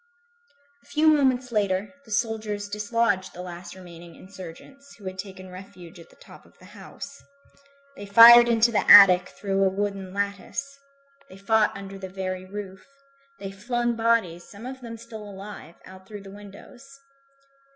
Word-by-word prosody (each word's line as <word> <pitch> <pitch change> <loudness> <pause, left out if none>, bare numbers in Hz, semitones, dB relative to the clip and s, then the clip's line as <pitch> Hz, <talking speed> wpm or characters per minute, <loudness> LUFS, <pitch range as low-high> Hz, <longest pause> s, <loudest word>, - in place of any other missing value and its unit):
A - - -27
few 305 +1 0
moments 260 -4 +2
later, 200 -1 -1
the 220 - -15
soldiers 215 -2 -2
dislodged 210 -2 -1
the 180 - -8
last 175 0 -10
remaining 170 -2 -13
insurgents, 190 +10 -13
who 205 - -17
had 185 0 -7
taken 190 -1 -9
refuge 180 -2 -13
at 165 - -15
the - - -22
top - - -17
of - - -24
the - - -18
house. 280 - -11 0.7
They 205 - -10
fired 235 +3 +9
into 230 0 +3
the 215 - -1
attic 185 -3 +8
through 195 -1 -2
a 190 - +3
wooden 195 -1 -4
lattice. 200 +8 -4 0.5
They 190 - -13
fought 210 +1 +1
under 195 0 -9
the 190 -1 -8
very 185 -1 -5
roof. 195 -1 -9 0.5
They 195 -1 -7
flung 240 +4 -2
bodies, 225 -7 0
some 205 +3 -12
of 260 +1 -8
them 230 -2 -8
still 225 -1 -11
alive, 200 -4 -11
out 190 0 -15
through 205 -1 -10
the 195 - -12
windows. 205 +4 -14
200 Hz, 160 wpm, -24 LUFS, 190-230 Hz, 0.7 s, fired